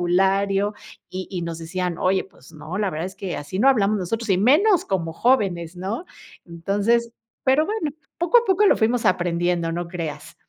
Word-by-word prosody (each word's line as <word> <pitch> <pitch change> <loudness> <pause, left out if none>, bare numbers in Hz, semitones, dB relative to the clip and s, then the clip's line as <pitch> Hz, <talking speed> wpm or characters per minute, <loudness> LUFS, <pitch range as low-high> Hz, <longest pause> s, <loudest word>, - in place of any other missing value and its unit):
vocabulario, 195 +3 +2 0.4
y 185 0 -5
y 180 -3 -4
nos 165 -1 -4
decían: 175 +1 -3
"Oye, 190 +1 +1
pues 165 -6 -19
no, 160 +4 -6
la 205 -2 0
verdad, 160 +2 -3
es 190 +1 -10
que 195 -3 -4
así 145 +6 -5
no 255 +6 +5
hablamos 215 -5 +3
nosotros, 225 +5 -3
y 190 -2 +3
menos 315 - +4
como 170 -4 -2
jóvenes, 180 -6 +1
¿no?" 200 - -4 0.4
Entonces, 205 +7 0 0.3
pero 275 +4 +3
bueno, 415 -7 -2 0.3
poco 350 +8 +5
a 475 - -1
poco 400 0 +3
lo - - +5
fuimos 230 +2 +1
aprendiendo, 175 -1 +1
no 175 0 -4
creas. 170 -3 -6
190 Hz, 185 wpm, -23 LUFS, 175-235 Hz, 0.4 s, no